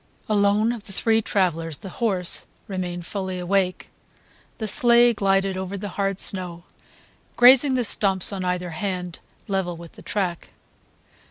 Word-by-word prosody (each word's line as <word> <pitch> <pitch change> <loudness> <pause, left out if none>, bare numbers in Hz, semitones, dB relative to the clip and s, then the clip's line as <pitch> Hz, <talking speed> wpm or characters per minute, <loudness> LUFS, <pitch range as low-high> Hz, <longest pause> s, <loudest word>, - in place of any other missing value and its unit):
Alone 210 +1 +2
of 230 -3 -7
the 200 - -9
three 225 +3 +2
travellers 165 -7 -1
the 195 - -9
horse 190 -6 +1 0.2
remained 180 -3 -4
fully 190 -2 -4
awake. 185 +1 -1 0.7
The 220 - -4
sleigh 240 +2 +5
glided 195 -2 +1
over 190 +1 -5
the 205 +1 -6
hard 195 0 -2
snow, 180 -3 -2 0.7
grazing 260 +2 +6
the 250 - +1
stumps 195 -3 +2
on 190 -1 -4
either 180 -1 -2
hand 180 0 -4 0.3
level 190 -4 -2
with 170 -1 -11
the - - -14
track. 185 -5 -3
195 Hz, 145 wpm, -23 LUFS, 180-210 Hz, 0.7 s, grazing